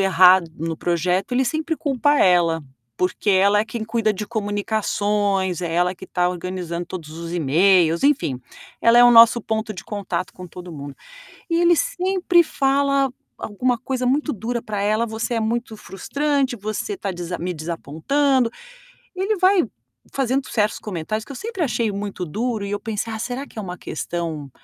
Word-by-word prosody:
errado 185 -2 +5
no 165 0 -3
projeto. 180 +4 0
Ele 255 +2 +2
sempre 315 +4 -1
culpa 290 +1 +1
ela, 170 -3 +3 0.3
porque 185 - 0
ela 200 +2 +4
é 215 - 0
quem 225 -1 -5
cuida 220 -1 0
de 210 +1 -5
comunicações, 205 -3 -1
é 170 - -2
ela 180 +2 +1
que 190 - -11
está 180 -1 0
organizando 175 -1 -4
todos 170 -4 -7
os 165 +1 -7
e-mails, 170 +2 +3
enfim, 260 - +1 0.4
ela 230 +1 +6
é 245 - +9
o 245 - +7
nosso 230 0 +8
ponto 220 0 -2
de 185 - -9
contato 205 -4 -4
com 185 - -10
todo 180 0 -10
mundo. 140 -2 -8 0.6
E 335 0 +2
ele 345 0 +5
sempre 370 -7 +2
fala 275 -1 +1 0.3
alguma 245 +4 -1
coisa 255 0 -2
muito 295 +4 +1
dura 235 +2 -3
pra 210 -1 -4
ela: 215 +3 +1
"Você 225 +2 -3
é 230 - 0
muito 225 0 -2
frustrante, 275 +6 -1
você 215 - -4
tá 200 - -4
desa 175 0 -5
me 180 +2 -3
desapontando", 175 - 0 0.7
e 370 - -4
ele 430 +2 +1
vai 370 -2 +4 0.5
fazendo 265 0 0
certos 215 -2 0
comentários 210 +3 -4
que - - -10
eu - - -10
sempre 440 -3 -5
achei 235 -6 0
muito 200 -2 -4
duro. 220 +5 -2
E 200 - -5
eu 205 - -1
pensei: 220 +1 -4
"Ah, 220 - -5
será 250 +4 -4
que 220 - -9
é - - -2
uma 180 -2 -6
questão 160 -6 -4
210 Hz, 180 wpm, -22 LUFS, 180-255 Hz, 0.7 s, é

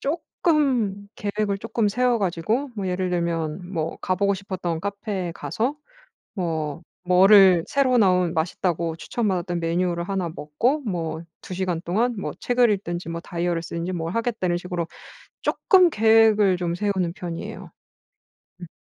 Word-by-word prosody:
쪼끔 275 - 0
계획을 205 -1 -2
쪼끔 225 0 0
세워 245 +2 +2
가지고 205 +9 -1
뭐 195 -3 -3
예를 185 0 -1
들면 170 0 -2
뭐 165 -2 -2
가보고 200 +2 +1
싶었던 185 -4 -4
카페에 200 -2 -3
가서 250 - -2 0.6
뭐 160 -4 -3 0.2
뭐를 185 -1 +6
새로 265 -3 +2
나온 180 -4 +3
맛있다고 165 0 -1
추천 230 +6 -3
받았던 175 -2 -1
메뉴를 170 +1 0
1 190 -2 -2
먹고 165 - -1
뭐 165 -5 -3 0.2
2 185 - -6
시간 180 -3 -1
동안 220 +9 0
뭐 - - -3
책을 245 -2 +3
읽든지 175 -4 -3
뭐 165 0 -4
다이어리를 170 -1 -2
쓰든지 170 +2 -4
뭘 165 -1 -3
하겠다는 225 -7 0
식으로 175 -1 -3 0.5
쪼끔 370 -3 +4
계획을 220 - +4
좀 170 -1 -1
세우는 185 -3 -1
편이에요. 170 -2 -7 0.9
음. 175 - -7
185 Hz, 295 characters per minute, -24 LUFS, 170-215 Hz, 0.9 s, 뭐를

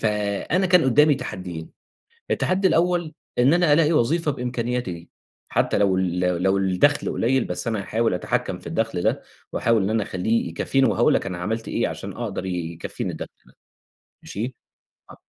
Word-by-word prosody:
فأنا 105 - 0
كان 180 -2 +5
قُدّامي 145 +3 +5
تحديين، 90 -10 -6 0.6
التحدي 190 +1 +2
الأول 170 -1 +1 0.3
إن 130 +6 +5
أنا 175 -3 +3
ألاقي 155 +1 +4
وظيفة 155 +3 +2
بإمكانياتي 125 -4 -2
دي، 85 0 -10 0.4
حتّى - - +1
لو 100 -2 +3
ال 90 -1 0
لو 90 0 +2
ال 85 - -4
لو 95 +1 +3
الدَخل 95 +10 +2
قليّل 130 +2 +1
بس 90 - -4
أنا 110 -3 -1
هحاول 115 0 0
أتحكّم 90 - -2
في - - -15
الدَخل 110 -6 -1
ده - - 0 0.3
وأحاول 115 -2 +2
إن 95 - 0
أنا 110 0 +1
أخلّيه 100 +2 -1
يكفّيني 130 +11 +1
وهاقول - - +3
لك - - 0
أنا 90 -2 -4
عملت 110 +5 -3
إيه - - 0
عشان - - -6
أقدر 95 - -4
ي 90 -3 -3
يكفّيني 85 - -5
الدَخل. - - -6 1.0
ماشي؟ 120 +5 -5 0.6
آه. - - -13
115 Hz, 170 wpm, -23 LUFS, 95-145 Hz, 1.0 s, كان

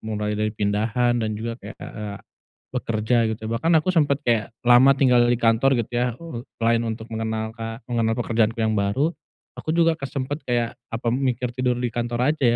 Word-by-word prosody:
mulai 105 -1 -3
dari 105 +1 0
pindahan 110 +4 +1
dan 110 - -1
juga 115 +1 -3
kayak, 105 +2 -9
ah, - - -7
eee, 105 -1 -5
ak - - -20 0.5
bekerja, 110 +2 0
gitu. 110 0 -5
Bahkan 115 +10 0
aku 185 +4 0
sempet 145 -4 +3
kayak 115 -3 +1 0.2
lama 125 +3 +7
tinggal 125 -3 +5
di 120 - +3
kantor, 120 +3 +3
gitu 115 - -3
ya. 120 +1 +2
Eee, 165 -9 -7 0.2
selain 115 0 +2
untuk 110 -1 -4
mengenalka 110 +1 -4
mengenal 115 -2 0
pekerjaanku 115 -1 +1
yang 110 -1 +1
baru, 120 - +1 0.4
aku 155 - -5
juga 165 -1 +4
ke 160 - -19
sempet 145 +1 -3
kayak, 120 -1 0 0.2
apa, 115 +1 -3
mikir 125 -2 -1
tidur 125 -1 0
di 125 - 0
kantor 120 +4 +1
aja, 155 - -11
115 Hz, 190 wpm, -23 LUFS, 110-125 Hz, 0.5 s, lama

